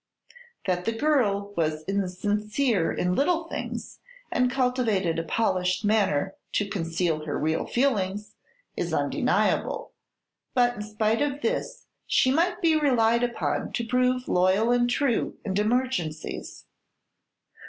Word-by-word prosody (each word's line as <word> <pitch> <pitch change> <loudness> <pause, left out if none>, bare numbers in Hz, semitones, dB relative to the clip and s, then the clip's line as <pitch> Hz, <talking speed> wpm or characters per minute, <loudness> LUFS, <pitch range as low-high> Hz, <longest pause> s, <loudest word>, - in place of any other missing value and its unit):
That 180 -1 -1
the 225 - 0
girl 205 -9 +1
was 155 -2 -1
insincere 205 +2 0
in 180 0 0
little 325 - +1
things - - -6 0.3
and 250 0 +2
cultivated 245 -10 +1
a - - -2
polished 185 -1 0
manner 195 -5 +2 0.2
to 205 - +1
conceal 165 -4 -1
her 145 - -2
real 160 +1 -1
feelings, 210 -6 0 0.4
is - - -2
undeniable; - - 0 0.6
but 245 -1 +4
in 220 - -7
spite 215 +2 0
of 290 0 -1
this - - -2 0.2
she 255 - +3
might 345 +6 +1
be 325 -1 +4
relied 235 -6 +3
upon 240 -1 -2
to 235 - -1
prove 250 +1 +1
loyal 190 +6 +3
and 245 0 +3
true 245 -1 0
in 190 -2 -2
emergencies. 210 -9 -2
215 Hz, 125 wpm, -26 LUFS, 185-250 Hz, 0.6 s, but